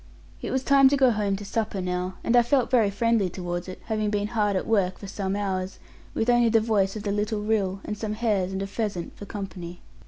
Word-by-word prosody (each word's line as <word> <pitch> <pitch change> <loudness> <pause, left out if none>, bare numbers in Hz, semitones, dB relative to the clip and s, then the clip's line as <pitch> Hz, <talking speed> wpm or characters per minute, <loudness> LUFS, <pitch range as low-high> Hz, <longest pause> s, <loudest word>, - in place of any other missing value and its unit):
It - - -4
was 260 0 -1
time 275 -1 +6
to 285 - +2
go 260 -2 +5
home 205 -3 0
to 205 +1 -7
supper 210 -1 -2
now, 180 0 -2
and 235 - +2
I 240 - +8
felt 245 +1 +1
very 230 -5 +4
friendly 215 -1 +1
towards 175 0 -4
it, 185 - -8
having 215 -2 -1
been 205 0 -1
hard 210 -3 +1
at 185 - -1
work 195 -5 +1
for - - -10
some 195 0 -3
hours, 190 -2 -2 0.4
with 225 - 0
only 240 -1 +4
the 225 0 +4
voice 210 -3 +1
of 210 - -5
the 205 - -1
little 210 +1 -1
rill, 200 -3 0
and 210 - -3
some 210 0 -3
hares 210 -5 0
and 190 0 -2
a - - -2
pheasant 200 -3 -4
for 205 - -9
company. 180 -4 -7
205 Hz, 240 wpm, -26 LUFS, 190-225 Hz, 0.4 s, I